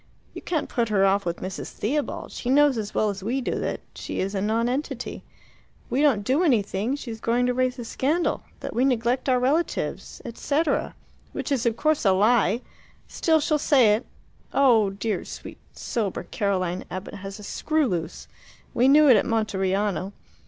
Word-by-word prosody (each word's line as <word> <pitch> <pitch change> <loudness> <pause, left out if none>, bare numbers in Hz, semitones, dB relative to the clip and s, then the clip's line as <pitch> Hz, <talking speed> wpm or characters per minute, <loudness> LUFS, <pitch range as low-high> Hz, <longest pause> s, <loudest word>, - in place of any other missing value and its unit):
You - - -8
can't 315 -4 -2
put 235 -2 -1
her 195 -2 +3
off 200 +1 +2
with 170 - -3
Mrs. 190 +1 -5
Theobald; 285 +7 -2
she 245 - -5
knows 290 0 +5
as 215 -2 -4
well 215 -1 +2
as 195 -1 -8
we 235 +7 -1
do 255 - -2
that - - -3
she - - -5
is 195 +2 -1
a 195 - -1
nonentity. 230 +7 -2 0.6
If - - -29
we 265 - +1
don't 265 -9 +3
do 265 - +2
anything 225 - +1
she's 230 -6 -7
going 240 +2 +1
to 250 - +1
raise 255 0 0
a 240 - -6
scandal 300 +9 0 0.2
that - - -5
we 245 - +1
neglect 250 0 +1
our 250 -1 +3
relatives, 290 +7 -1
&c., 290 +6 0 0.7
which - - -4
is, 250 -4 +1
of 230 -1 0
course, 310 +2 +1
a 195 -3 +4
lie. 215 +2 +3 0.5
Still 320 -1 +2
she'll 300 0 +1
say 255 -8 +5
it. 220 +4 -2 0.4
Oh, 235 -7 +4
dear, 200 0 -3
sweet, - - -9
sober 210 -8 -3
Caroline 185 -1 -1
Abbott 185 +2 -6
has 195 -1 -7
a 210 - -11
screw 310 +8 0
loose! 175 -8 -3 0.5
We 245 +2 +3
knew 295 +2 +7
it 250 -5 +8
at - - +1
Monteriano. 200 -3 0
230 Hz, 180 wpm, -25 LUFS, 200-270 Hz, 0.7 s, it